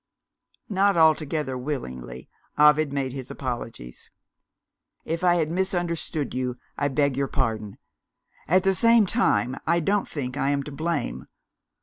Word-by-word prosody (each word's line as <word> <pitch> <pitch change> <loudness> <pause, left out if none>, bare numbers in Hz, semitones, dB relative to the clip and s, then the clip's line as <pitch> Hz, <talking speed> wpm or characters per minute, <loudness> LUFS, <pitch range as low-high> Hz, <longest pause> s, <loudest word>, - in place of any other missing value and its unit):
Not 200 -1 +2
altogether 155 -3 +2
willingly, 65 - -5 0.3
Ovid 150 0 +5
made 135 -2 -2
his 130 -2 -7
apologies. 115 - -6 1.0
"If 165 +2 -3
I 175 -1 +5
have 160 -3 0
misunderstood 175 -4 -2
you, 125 -1 -2 0.2
I 140 - 0
beg 140 -1 +1
your 140 0 0
pardon. 110 -5 -2 0.7
At 185 +3 +3
the 195 0 +3
same 230 +2 +5
time, 180 - +1
I 170 +1 +3
don't 200 +5 0
think 130 -3 -5
I 135 - +1
am 140 -1 0
to 150 - -8
blame. 145 - -3
145 Hz, 135 wpm, -25 LUFS, 130-170 Hz, 1.0 s, Ovid